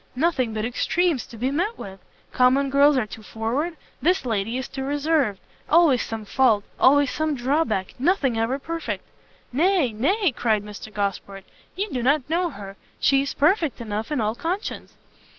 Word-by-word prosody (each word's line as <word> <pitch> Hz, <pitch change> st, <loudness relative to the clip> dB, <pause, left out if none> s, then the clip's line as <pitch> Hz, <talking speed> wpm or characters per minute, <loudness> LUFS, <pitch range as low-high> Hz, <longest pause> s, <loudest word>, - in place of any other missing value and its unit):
nothing 265 Hz, -5 st, +1 dB
but 215 Hz, 0 st, -2 dB
extremes 310 Hz, +4 st, 0 dB
to 230 Hz, -, -12 dB
be 255 Hz, +4 st, -1 dB
met 365 Hz, +10 st, -1 dB
with! 195 Hz, 0 st, -9 dB, 0.3 s
common 265 Hz, +2 st, +3 dB
girls 280 Hz, +1 st, +5 dB
are 245 Hz, -, +1 dB
too 215 Hz, +2 st, -10 dB
forward, 245 Hz, +11 st, -3 dB, 0.2 s
this 360 Hz, -1 st, +2 dB
lady 225 Hz, 0 st, -1 dB
is 260 Hz, -, -4 dB
too 270 Hz, -, -6 dB
reserved 285 Hz, -6 st, 0 dB, 0.3 s
always 315 Hz, -6 st, +5 dB
some 225 Hz, -1 st, -5 dB
fault! 220 Hz, -3 st, +3 dB, 0.2 s
always 285 Hz, 0 st, +5 dB
some 310 Hz, -1 st, -1 dB
drawback! 250 Hz, -6 st, 0 dB
nothing 275 Hz, -4 st, +2 dB
ever 225 Hz, +4 st, 0 dB
perfect!" 330 Hz, +3 st, -5 dB, 0.5 s
"Nay, 325 Hz, -, +2 dB
nay," 350 Hz, -, +1 dB
cried 220 Hz, -4 st, 0 dB
Mr 210 Hz, +1 st, -9 dB
Gosport, 200 Hz, -1 st, -3 dB, 0.3 s
"you 395 Hz, +4 st, -2 dB
do 250 Hz, -, -2 dB
not 275 Hz, +2 st, +2 dB
know 345 Hz, +3 st, 0 dB
her; 200 Hz, -7 st, -10 dB, 0.2 s
she 275 Hz, -1 st, +4 dB
is 280 Hz, -, -4 dB
perfect 320 Hz, -, +2 dB
enough 220 Hz, +2 st, -4 dB
in 295 Hz, -, 0 dB
all 215 Hz, -1 st, 0 dB
conscience." 350 Hz, -, -4 dB
265 Hz, 170 wpm, -24 LUFS, 225-315 Hz, 0.5 s, girls